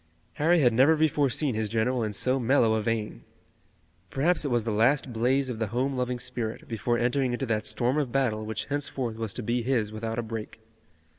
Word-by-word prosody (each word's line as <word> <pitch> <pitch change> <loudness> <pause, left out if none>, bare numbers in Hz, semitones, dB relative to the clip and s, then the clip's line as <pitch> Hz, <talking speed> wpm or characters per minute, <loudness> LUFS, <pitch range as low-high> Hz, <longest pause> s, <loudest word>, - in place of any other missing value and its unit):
Harry 165 +2 +4
had 120 -4 +4
never 135 +7 +5
before 150 -3 +2
seen 135 +1 0
his 110 -1 -2
general 115 +3 0
in 105 - -2
so 130 +6 +1
mellow 120 -2 +3
a 110 - +1
vein. 110 -1 -3 0.9
Perhaps 155 +5 +1
it 145 - -1
was 120 -2 +1
the 115 - -2
last 125 +4 +2
blaze 130 +4 +1
of 120 -3 -5
the 110 - -1
home 130 +5 -1
loving 125 -1 -1
spirit, 120 -2 -4
before 120 +1 -1
entering 125 +2 0
into 130 +2 -2
that 110 -3 -1
storm 120 +6 +1
of 135 -5 -2
battle 115 -5 0
which 110 +1 -4
henceforth 135 -5 -3
was 110 -2 -3
to 125 - -4
be 120 +3 0
his 115 -4 0
without 110 +1 -4
a 120 - -1
break. 110 -1 -7
120 Hz, 210 wpm, -27 LUFS, 110-135 Hz, 0.9 s, never